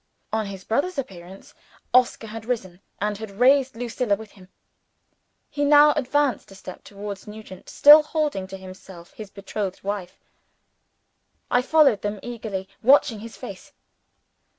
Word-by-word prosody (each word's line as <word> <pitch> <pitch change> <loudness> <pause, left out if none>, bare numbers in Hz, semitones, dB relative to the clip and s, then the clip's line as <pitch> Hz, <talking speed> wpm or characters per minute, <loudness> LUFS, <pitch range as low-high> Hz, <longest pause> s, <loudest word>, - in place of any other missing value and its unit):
On 220 -1 -1
his 195 -1 -8
brother's 285 - -1
appearance, 190 -7 -8 0.4
Oscar 250 -2 +3
had 225 0 -8
risen, 190 -7 -4 0.2
and 210 0 -2
had 220 -1 -7
raised 265 0 +4
Lucilla 235 -2 -1
with 220 0 -12
him. 185 -2 -17 1.0
He 290 -1 -3
now 295 +1 +6
advanced 290 -3 0
a 195 - -13
step 185 -1 -11
towards 200 -1 -8
Nugent, 210 -3 -11
still 295 +2 +8
holding 300 - -2
to 195 0 -8
him 190 -1 -10 0.4
his 215 -2 -10
betrothed 200 -1 -6
wife. 195 -2 -5 1.3
I 245 - +4
followed 275 -5 +3
them, 205 0 -4
eagerly 215 -5 -6
watching 245 -3 +4
his 225 +1 -10
face. - - -10
220 Hz, 140 wpm, -23 LUFS, 195-265 Hz, 1.3 s, still